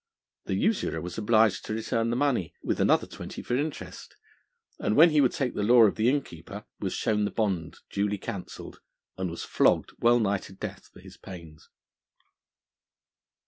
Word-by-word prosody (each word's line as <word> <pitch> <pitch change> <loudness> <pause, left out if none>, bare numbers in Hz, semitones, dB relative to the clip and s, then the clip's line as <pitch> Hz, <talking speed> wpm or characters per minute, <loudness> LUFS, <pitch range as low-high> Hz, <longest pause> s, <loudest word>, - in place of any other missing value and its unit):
The - - -1
usurer 215 - 0
was 90 +5 -6
obliged 110 -1 +3
to 110 - -3
return 115 +1 -1
the 120 - 0
money, 125 - 0
with - - -1
another - - +3
twenty - - -8
for 120 - -1
interest, 145 +3 -5 0.6
and 105 - 0
when 165 +2 +7
he 150 -1 +4
would 130 - +3
take 130 -3 -2
the - - -3
law 120 +3 +6
of 105 - +5
the 115 +2 +2
innkeeper, 130 - -4
was - - -3
shown 105 -1 0
the 105 - 0
bond 95 -7 -2
duly 100 +1 0
cancelled, 95 -1 -7 0.4
and 95 -1 -3
was 85 - -6
flogged - - +2
wellnigh 115 -4 +3
to 95 - -12
death 95 - -7
for - - -15
his - - -14
pains. 85 -4 -12
110 Hz, 170 wpm, -27 LUFS, 95-120 Hz, 0.6 s, when